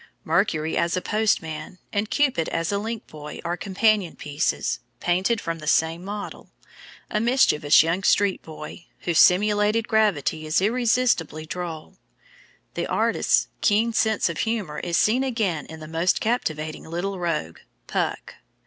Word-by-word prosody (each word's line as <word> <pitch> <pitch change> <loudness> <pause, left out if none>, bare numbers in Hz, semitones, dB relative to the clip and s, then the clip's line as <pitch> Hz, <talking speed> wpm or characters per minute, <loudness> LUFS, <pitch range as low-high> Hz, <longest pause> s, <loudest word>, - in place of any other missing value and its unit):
Mercury 155 0 +1
as 170 +1 +1
a - - +2
Postman 185 -4 -1 0.2
and 205 +1 -1
Cupid 265 - +1
as 165 +2 -1
a 200 - 0
Link 225 +1 -5
Boy 150 -1 -9
are 170 +1 -1
companion 200 -1 +1
pieces, 145 +1 -1 0.2
painted 185 +6 +1
from 165 -3 -4
the 155 - -9
same 160 +2 +2
model, 205 +1 -7 0.6
a 210 - +1
mischievous 215 - +4
young 165 +4 0
street 195 0 +2
boy, 155 +1 -10
whose 170 -2 +1
simulated 210 +4 +4
gravity 165 - +1
is 155 - +2
irresistibly 220 -7 +1
droll. 165 -2 -6 0.7
The - - -2
artist's - - +2
keen 225 +3 +2
sense 220 -1 +2
of 170 -3 -4
humor 215 -10 -2
is 175 0 -1
seen 245 +5 +3
again 215 - -1
in 160 - -10
that 155 - -8
most 165 +3 +1
captivating 155 -10 -2
little 180 +4 -3
rogue, 155 - -2 0.3
Puck. - - -3
180 Hz, 145 wpm, -24 LUFS, 160-215 Hz, 0.7 s, mischievous